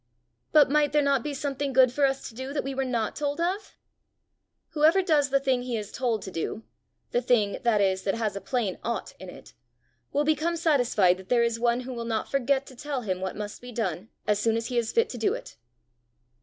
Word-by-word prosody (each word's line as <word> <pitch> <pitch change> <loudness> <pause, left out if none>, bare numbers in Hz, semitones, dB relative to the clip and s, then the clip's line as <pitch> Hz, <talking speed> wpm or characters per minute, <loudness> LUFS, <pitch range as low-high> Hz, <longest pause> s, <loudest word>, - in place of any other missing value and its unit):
"But 295 -3 +6
might 295 -1 +3
there 300 - +4
not 280 -2 +2
be 290 +3 -4
something 280 -1 -2
good 255 -1 +6
for 280 +1 +3
us 270 0 -3
to - - -11
do 260 +4 -6
that 295 - -1
we 275 - -4
were 270 0 -1
not 235 -4 -1
told 290 +1 -2
of?" 375 +4 -2 0.9
"Whoever 325 +4 +4
does 300 -5 +3
the 275 0 +3
thing 265 -2 +1
he 245 -2 -3
is 210 -1 -6
told 235 -4 -1
to 190 - -7
do 185 +6 -4 0.5
the 245 - +1
thing, 220 -5 +2
that 230 -3 +2
is, 190 -1 +2
that 195 +1 -1
has 220 -4 -2
a 200 - -5
plain 230 -8 -2
ought 235 +1 -3
in - - -9
it, - - -13 0.6
will 290 - +1
become 315 +3 +1
satisfied 245 - +3
that 190 0 -13
there 240 -1 +4
is 235 -1 0
one 240 +1 +2
who 255 +1 -6
will 235 -1 -5
not 225 -1 -2
forget 275 0 +1
to 260 - -13
tell 280 +1 -4
him 185 -5 -3
what 190 0 -3
must 210 0 -6
be 245 0 -9
done 215 -3 -3 0.2
as 210 -1 +2
soon 225 +1 +2
as 230 0 -3
he 245 - -2
is 230 -1 -2
fit 460 0 +3
to 245 - -6
do 225 - +1
it." - - -10
245 Hz, 235 wpm, -27 LUFS, 220-280 Hz, 0.9 s, But